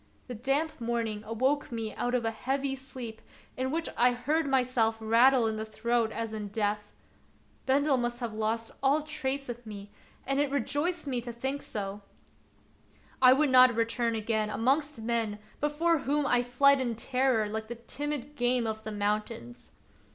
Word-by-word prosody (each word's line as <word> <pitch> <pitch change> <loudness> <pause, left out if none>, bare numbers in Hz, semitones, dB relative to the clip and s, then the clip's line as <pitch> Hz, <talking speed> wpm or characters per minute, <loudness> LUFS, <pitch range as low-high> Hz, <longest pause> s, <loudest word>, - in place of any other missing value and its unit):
The 250 - -5
damp 275 +6 -1
morning 230 -2 -2
awoke 260 +6 0
me 225 -2 -3
out 245 +1 -1
of 240 -2 0
a 225 - +1
heavy 270 +4 -2
sleep 255 -4 -8 0.3
in 260 +1 -1
which 325 +4 -1
I 245 +1 +4
heard 295 +6 0
myself 250 -4 +2
rattle 235 +3 +5
in 220 -1 -1
the 215 - -2
throat 225 +1 0
as 225 -1 -4
in 210 -1 -4
death. 210 0 -2 0.7
Bendel 275 +1 +3
must 240 0 -2
have 235 -3 -4
lost 220 +1 -2
all 280 +3 +3
trace 275 -2 -3
of 240 0 -6
me, 205 -2 -9 0.3
and 275 +1 0
it 290 -1 +2
rejoiced 295 +5 -1
me 255 -4 -1
to 240 0 -6
think 265 +4 -3
so. 200 -1 -4 1.2
I 255 -1 +8
would 285 0 +2
not 255 -2 +7
return 230 0 0
again 220 -1 -1
amongst 275 +5 +1
men 225 -2 -1 0.2
before 315 +3 +2
whom 290 +1 0
I 245 -2 +3
fled 265 +3 +4
in 240 -3 -1
terror 250 -1 +1
like 220 +1 -4
the 240 - -5
timid 290 +4 -5
game 245 -2 +2
of 220 -1 -3
the 215 - -5
moun 210 +1 +1
tains. 120 - -11
240 Hz, 175 wpm, -29 LUFS, 220-275 Hz, 1.2 s, I